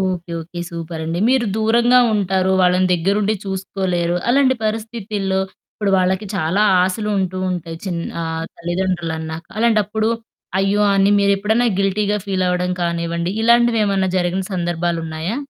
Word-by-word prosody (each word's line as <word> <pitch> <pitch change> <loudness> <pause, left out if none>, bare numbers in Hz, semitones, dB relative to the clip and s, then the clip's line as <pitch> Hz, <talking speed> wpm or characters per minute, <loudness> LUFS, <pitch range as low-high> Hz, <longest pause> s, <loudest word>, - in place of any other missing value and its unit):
Okay. 180 -3 -2
Okay. 175 +2 -8
సూపరండి. 165 0 -4
మీరు 260 -3 +2
దూరంగా 235 +3 +4 0.2
ఉంటారు. 190 -2 +1
వాళ్ళని 180 +1 +3
దగ్గరుండి 200 +5 +1
చూసుకోలేరు. 185 -3 -2
అలాంటి 260 +1 +4
పరిస్థితుల్లో 215 -3 -2 0.3
ఇప్పుడు 205 -2 -1
వాళ్ళకి 190 +3 0
చాలా 185 +4 +1 0.2
ఆశలుంటూ 190 -1 -1
ఉంటాయి. 170 -2 -4
చిన్ 175 -3 -2 0.2
ఆహ్, 160 0 -3
తల్లిదండ్రులన్నాక. 170 -2 -3
అలాంటప్పుడు 220 -1 +2 0.5
అయ్యో! 195 +2 +2
అన్ని 195 +1 +4
మీరెప్పుడన్నా 200 +4 +2
గిల్టీ‌గా 205 +1 +1
ఫీలవ్వడం 180 -2 0
కానివ్వండి, 170 0 -1
ఇలాంటివేమన్నా 225 -5 +3
జరిగిన 180 +1 0
సందర్భాలున్నాయా? 170 +1 -2
190 Hz, 110 wpm, -19 LUFS, 175-210 Hz, 0.5 s, దూరంగా